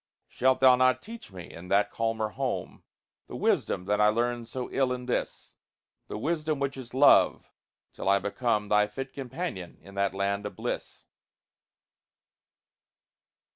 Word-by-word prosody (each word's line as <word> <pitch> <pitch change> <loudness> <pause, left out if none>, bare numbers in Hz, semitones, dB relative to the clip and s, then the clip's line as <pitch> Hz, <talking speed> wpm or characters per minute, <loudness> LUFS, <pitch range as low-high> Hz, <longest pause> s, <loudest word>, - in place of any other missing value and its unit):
Shalt 130 +1 +1
thou 130 -1 +8
not 130 0 +3
teach 230 - -10
me, 90 -3 -10
in 85 +2 -10
that 100 +2 +2
calmer 115 -1 -1
home, 130 +2 -4 0.5
The - - -8
wisdom 90 - 0
that 105 +2 +1
I 105 - +6
learned 120 +1 0
so 125 +1 -4
ill 135 -2 +1
in 125 0 -3
this 125 - -3 0.5
The - - -5
wisdom 155 +4 -1
which 140 0 -1
is 130 -2 -9
love 140 +2 +5 0.4
till - - -2
I 100 - +5
become 105 +1 -1
Thy 105 0 +4
fit 135 +5 -7
companion 130 - -5
in 100 - -15
that 100 0 0
land 100 +1 -1
of - - -10
bliss? - - -5
115 Hz, 150 wpm, -28 LUFS, 105-130 Hz, 0.5 s, thou